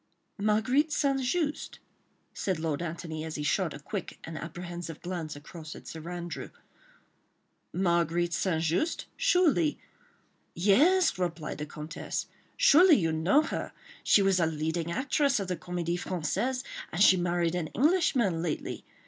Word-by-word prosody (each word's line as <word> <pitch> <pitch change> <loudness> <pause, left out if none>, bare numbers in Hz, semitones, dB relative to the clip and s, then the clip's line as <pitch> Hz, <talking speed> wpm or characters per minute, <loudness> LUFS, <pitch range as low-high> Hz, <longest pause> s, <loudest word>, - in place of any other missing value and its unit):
"Marguerite 220 +9 +2
St. 275 -2 +1
Just?" 300 +3 -1 0.6
said 190 -3 -1
Lord 160 -1 -2
Antony, 160 -2 -5
as 160 -1 -5
he 150 - -3
shot 175 +2 +1
a - - -9
quick 190 +5 -6
and 160 - -7
apprehensive 170 0 -6
glance 170 -4 -4
across 155 +2 -9
at - - -12
Sir 165 +1 -7
Andrew. 175 -1 -5 1.2
"Marguerite 170 -1 +1
St. 165 -4 0
Just?—Surely.. 325 - +1 0.4
." - - -41
"Yes!" 265 - +4
replied 170 -4 -3
the 150 - -4
Comtesse, 150 +3 -5 0.3
"surely 360 -8 +7
you 165 -4 +1
know 175 - +3
her. - - -4 0.3
She 200 - +5
was 195 -1 +3
a 165 - +3
leading 160 +2 -2
actress 275 - +1
of 195 - -3
the 180 - -1
Comédie 175 0 -3
Française, 240 - -1 0.3
and 165 - -4
she 195 -2 +7
married 175 -1 0
an 175 -3 -2
Englishman 255 - +2
lately. 165 -3 -3
175 Hz, 140 wpm, -29 LUFS, 165-250 Hz, 1.2 s, surely